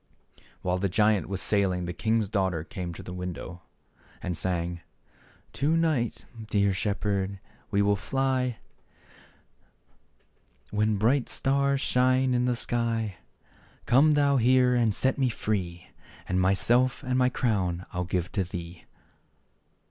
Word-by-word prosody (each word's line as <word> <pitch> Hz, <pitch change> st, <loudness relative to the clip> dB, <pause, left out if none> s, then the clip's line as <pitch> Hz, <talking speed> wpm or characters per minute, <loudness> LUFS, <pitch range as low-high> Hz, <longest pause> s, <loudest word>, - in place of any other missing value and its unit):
71 -, -, -26 dB, 0.2 s
While 90 Hz, 0 st, 0 dB
the 100 Hz, +1 st, 0 dB
giant 105 Hz, +1 st, +2 dB
was 95 Hz, -1 st, -2 dB
sailing 95 Hz, -4 st, +1 dB
the 85 Hz, -, -4 dB
king's 110 Hz, +1 st, 0 dB
daughter 95 Hz, -6 st, -1 dB
came 90 Hz, +1 st, -6 dB
to -, -, -9 dB
the 90 Hz, -, -8 dB
window 90 Hz, -1 st, -6 dB, 0.6 s
and 90 Hz, -, -3 dB
sang: 85 Hz, -1 st, -2 dB, 0.3 s
" -, -, -31 dB
To 155 Hz, +4 st, +2 dB
night, 155 Hz, -8 st, 0 dB, 0.2 s
dear 100 Hz, -2 st, +2 dB
shepherd, 100 Hz, 0 st, -1 dB, 0.3 s
we 100 Hz, 0 st, +2 dB
will 100 Hz, 0 st, +3 dB
fly, 130 Hz, +2 st, -1 dB, 2.1 s
When 105 Hz, 0 st, +1 dB
bright 120 Hz, +6 st, +2 dB
the -, -, -7 dB
stars 140 Hz, 0 st, +1 dB
shine 130 Hz, +1 st, +2 dB
in 125 Hz, 0 st, +1 dB
the 125 Hz, -1 st, +1 dB
sky; 115 Hz, -4 st, -2 dB, 0.7 s
Come 140 Hz, +6 st, +5 dB
thou 140 Hz, -1 st, +3 dB
here 125 Hz, +1 st, +4 dB
and 120 Hz, -3 st, +3 dB
set 130 Hz, +7 st, 0 dB
me 130 Hz, -2 st, +2 dB
free, 95 Hz, -6 st, -3 dB, 0.4 s
And 95 Hz, 0 st, +1 dB
myself 120 Hz, +7 st, +2 dB
and 125 Hz, 0 st, -1 dB
my 125 Hz, 0 st, +3 dB
crown 95 Hz, -8 st, -1 dB
I'll 90 Hz, 0 st, -1 dB
give 90 Hz, 0 st, -2 dB
to 95 Hz, -, 0 dB
thee." 85 Hz, -1 st, -8 dB
105 Hz, 140 wpm, -27 LUFS, 90-125 Hz, 2.1 s, Come